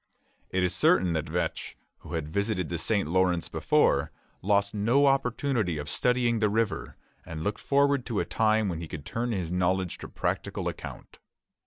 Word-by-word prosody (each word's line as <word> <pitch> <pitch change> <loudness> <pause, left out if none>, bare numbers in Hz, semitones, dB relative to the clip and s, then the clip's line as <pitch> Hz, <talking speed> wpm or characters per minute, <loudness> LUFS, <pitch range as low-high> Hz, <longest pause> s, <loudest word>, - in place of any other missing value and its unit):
It 95 0 0
is 90 - +1
certain 90 -2 +3
that 80 -2 -2
Vetch, - - -3 0.2
who 80 - -10
had 80 -3 -2
visited 100 +1 -1
the 85 - -3
St. 100 -2 +1
Lawrence 90 0 +1
before, 70 +3 +2 0.3
lost 100 0 +2
no 115 +7 +3
opportunity 125 - +1
of 75 0 -5
studying 120 +3 +1
the 105 -1 +2
river, 110 0 -1 0.3
and 80 -1 -6
looked 105 +3 -2
forward 140 -1 +2
to 115 -5 -1
a - - 0
time 110 -1 +2
when 85 -4 -3
he 85 - -6
could 75 -2 -8
turn 120 +1 -2
his 90 -6 -2
knowledge 90 0 0
to - - -7
practical - - -2
account. - - -8
100 Hz, 175 wpm, -28 LUFS, 85-115 Hz, 0.3 s, certain